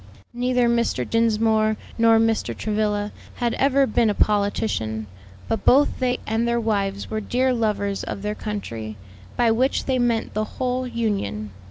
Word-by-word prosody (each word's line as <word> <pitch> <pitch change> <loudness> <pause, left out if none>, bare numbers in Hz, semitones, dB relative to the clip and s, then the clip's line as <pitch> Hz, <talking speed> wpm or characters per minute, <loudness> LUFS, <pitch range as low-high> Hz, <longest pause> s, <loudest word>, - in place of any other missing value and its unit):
Neither 245 0 +1
Mr. 235 - +1
Dinsmore 220 -1 +2 0.2
nor 230 -1 +5
Mr. 225 0 +1
Travilla 210 -1 -1 0.2
had 240 -1 -1
ever 275 0 +4
been 225 -1 +2
a 205 - 0
politician; 200 - 0 0.4
but 220 -3 -2
both 285 +3 +4
they 255 -1 +1
and 225 +2 0
their 235 0 +1
wives 200 -3 -1
were 215 0 -1
dear 255 +4 +1
lovers 210 -4 -1
of 195 - -5
their 210 0 -1
country, 115 - -5 0.4
by 235 -2 +4
which 255 +4 +1
they 260 -1 +1
meant 235 -2 0
the 215 - 0
whole 255 0 -1
Union. 150 - -2
225 Hz, 155 wpm, -23 LUFS, 205-240 Hz, 0.4 s, nor